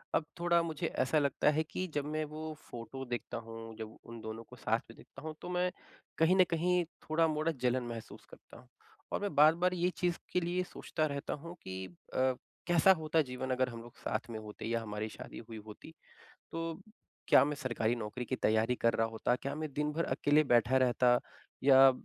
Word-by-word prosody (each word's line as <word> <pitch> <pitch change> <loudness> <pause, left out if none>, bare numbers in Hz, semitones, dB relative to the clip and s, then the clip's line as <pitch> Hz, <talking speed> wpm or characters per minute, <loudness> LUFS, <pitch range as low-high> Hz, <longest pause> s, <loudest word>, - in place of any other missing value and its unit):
अब 155 - +2
थोड़ा 170 0 +4
मुझे 160 -3 -2
ऐसा 130 +4 +2
लगता 140 +1 +2
है 155 +1 +1
कि 185 +4 -4
जब 145 -1 -1
मैं 155 +1 -1
वो 155 0 -5 0.2
फ़ोटो 120 +3 -6
देखता 120 -1 -4
हूँ, 115 0 -8
जब 110 0 -7
उन 115 -1 -9
दोनों 110 +1 -6
को 125 - -11
साथ 115 -1 +1
में 115 - -12
देखता - - -13
हूँ, 155 0 -5
तो - - -6
मैं 180 0 +1 0.5
कहीं 165 +3 +5
न 185 - +7
कहीं 175 +2 +2 0.3
थोड़ा-मोड़ा 155 0 +2
जलन 125 0 +2
महसूस 115 -2 -8
करता - - -14
हूँ। - - -18 0.4
और - - -1
मैं 205 -4 -1
बार-बार 165 +5 +5
ये 180 0 +2
चीज़ 175 -2 +1 0.2
के - - +4
लिए 175 +2 0
सोचता 155 -3 -2
रहता 140 -2 -3
हूँ 170 +1 -7
कि 95 0 -5 0.3
अ, 130 0 +3 0.3
कैसा 175 +2 +6
होता 160 0 +2
जीवन 130 -1 -4
अगर 130 0 +2
हम 115 -1 -7
लोग 120 0 -13
साथ 110 +2 -3
में 110 - -4
होते 105 0 -8
या 115 +1 0
हमारी 105 0 -3
शादी - - -9
हुई 115 - -6
होती? 110 +8 -11 0.6
तो 165 +1 -3 0.5
क्या - - +8
मैं 150 +1 -1
सरकारी 120 -4 0
नौकरी 115 +2 -4
की 130 - -2
तैयारी 110 +2 +2
कर 115 -1 +2
रहा 115 0 +2
होता, 115 +2 0
क्या 140 +2 -4
मैं 155 -1 -4
दिन-भर 150 +3 0
अकेले 145 +1 +3
बैठा 120 -1 +4
रहता 125 0 +4 0.5
या 135 -1 +9
135 Hz, 200 wpm, -33 LUFS, 115-160 Hz, 0.6 s, या